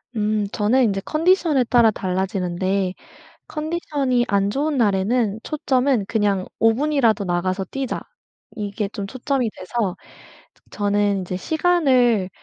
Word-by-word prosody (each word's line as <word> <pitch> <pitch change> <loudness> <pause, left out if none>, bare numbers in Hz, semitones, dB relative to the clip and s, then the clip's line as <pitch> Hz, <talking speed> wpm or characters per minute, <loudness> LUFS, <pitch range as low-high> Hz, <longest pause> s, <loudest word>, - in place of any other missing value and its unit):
음 210 -1 0
저는 230 +5 +2
인제 195 -4 0
컨디션에 325 -4 +2
따라 235 -1 +4
달라지는데 185 -1 -1 0.5
컨디션이 295 -6 -1
안 200 -1 +1
좋은 290 +6 -1
날에는 215 0 +1
초점은 265 -6 0
그냥 200 -4 0
5 225 0 +4
분이라도 245 -6 +1
나가서 185 +2 -1
뛰자 270 +6 -4 0.5
이게 205 0 -3
좀 205 -1 -5
초점이 260 +1 -2
돼서 195 -1 -3 0.8
저는 205 -1 +1
이제 185 0 -4
시간을 260 - +2
220 Hz, 265 characters per minute, -21 LUFS, 195-265 Hz, 0.8 s, 따라